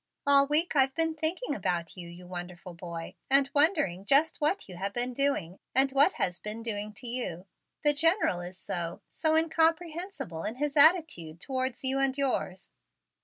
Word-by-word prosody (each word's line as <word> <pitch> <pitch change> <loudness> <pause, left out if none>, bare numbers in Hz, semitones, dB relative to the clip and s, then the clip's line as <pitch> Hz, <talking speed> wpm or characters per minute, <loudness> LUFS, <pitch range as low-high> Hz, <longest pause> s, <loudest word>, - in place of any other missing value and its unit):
"All 280 -1 +5
week 310 +3 +2
I've 270 -1 +3
been 325 -1 0
thinking 320 +4 -2
about 175 - -2
you, 175 -2 -9
you 175 +1 -12
wonderful 175 0 -8
boy, 170 -1 -7 0.2
and 275 0 +4
wondering 285 - +2
just 280 +10 +2
what 305 +7 0
you 185 - -10
have 195 +2 -3
been 245 +1 -2
doing 245 -10 -1 0.2
and 270 +1 +4
what 280 +7 +4
has 180 -1 -1
been 215 +2 -6
doing 210 -2 -3
to 215 - -10
you. 230 -8 -4 0.4
The 295 -1 +5
General 325 - +2
is 180 +1 -7
so 170 -1 -5
so 315 -1 0
incomprehensible 325 - -1
in 220 - -3
his 290 +2 -2
attitude 290 - +3
towards 260 +2 -3
you 265 +1 +1
and 270 0 +1
yours. 250 -9 -2
265 Hz, 170 wpm, -29 LUFS, 180-305 Hz, 0.4 s, All